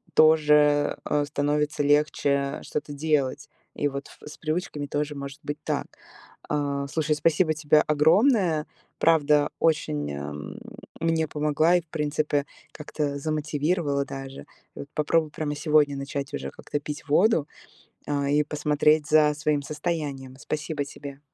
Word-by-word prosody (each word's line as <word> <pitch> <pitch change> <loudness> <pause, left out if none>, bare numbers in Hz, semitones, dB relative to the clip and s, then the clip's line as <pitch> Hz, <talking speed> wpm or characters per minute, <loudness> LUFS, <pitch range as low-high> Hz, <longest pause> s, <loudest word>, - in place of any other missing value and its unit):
тоже, 150 -2 +5
э, 145 0 +1
становится 145 0 0
легче 140 -1 +1
что-то 145 0 -4
делать. 145 -1 -1 0.3
И 145 - 0
вот 140 0 -6
ф - - -16
с - - -11
привычками 155 -2 -3
тоже 150 +1 -2
может 140 0 -7
быть 145 0 -4
так. - - -1 0.6
А, 140 -1 -1
слушай, 155 +1 0
спасибо 155 +2 +2
тебе 150 0 +3
огромное. 160 - +3 0.3
Правда, 150 -2 +4
очень 75 - 0 0.9
мне 165 -1 +1
помогла 150 +3 +2
и, 175 - -1
в 165 - -32
принципе, 150 -1 -1 0.3
как-то 150 -1 -3
замотивировала 150 -1 -1
даже. 135 0 -8 0.3
И - - -10
вот 140 - -7
попробую 155 0 +1
прямо 150 -1 -3
сегодня 150 -2 +2
начать 140 0 -5
уже 70 0 -4
как-то 145 - -5
пить 150 0 -7
воду, 165 -2 +3 0.6
а, 140 -1 0
и 150 +1 +3
посмотреть 150 0 +2
за 150 -1 +5
своим 150 -1 0
состоянием. 145 -3 -4
Спасибо 150 0 -3
тебе! 140 -1 -9
150 Hz, 135 wpm, -25 LUFS, 145-155 Hz, 0.9 s, тоже